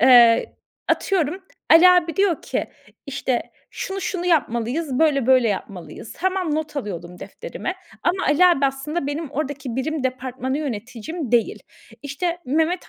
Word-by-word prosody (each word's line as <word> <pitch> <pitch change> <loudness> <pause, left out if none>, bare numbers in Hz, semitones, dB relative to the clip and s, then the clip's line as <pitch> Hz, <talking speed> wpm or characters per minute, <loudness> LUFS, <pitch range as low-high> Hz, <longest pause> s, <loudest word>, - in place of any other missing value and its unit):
eee, 240 -2 +6 0.3
atıyorum 365 -1 0 0.3
Ali 335 +3 +9
abi 350 -3 +3
diyor 390 -5 +2
ki, - - -2 0.4
işte, 270 -2 -1 0.3
"şunu 390 0 -5
şunu 360 -1 -3
yapmalıyız, 265 -2 0
böyle 290 -6 +3
böyle 255 -3 +5
yapmalıyız." 190 -1 -6
Tamam, 370 -3 0
not 305 -1 -3
alıyordum 180 -8 -5
defterime 465 - -6 0.3
ama 365 +2 0
Ali 300 +5 +5
abi 285 -6 +4
aslında 275 +4 -3
benim 290 +1 -4
oradaki 280 -4 -4
birim 285 +1 -2
departmanı 260 +1 -2
yöneticim 245 - -5
değil. 235 -2 +1 0.4
İşte, 335 +5 -2
Mehmet 320 +6 0
285 Hz, 135 wpm, -22 LUFS, 250-335 Hz, 0.4 s, Ali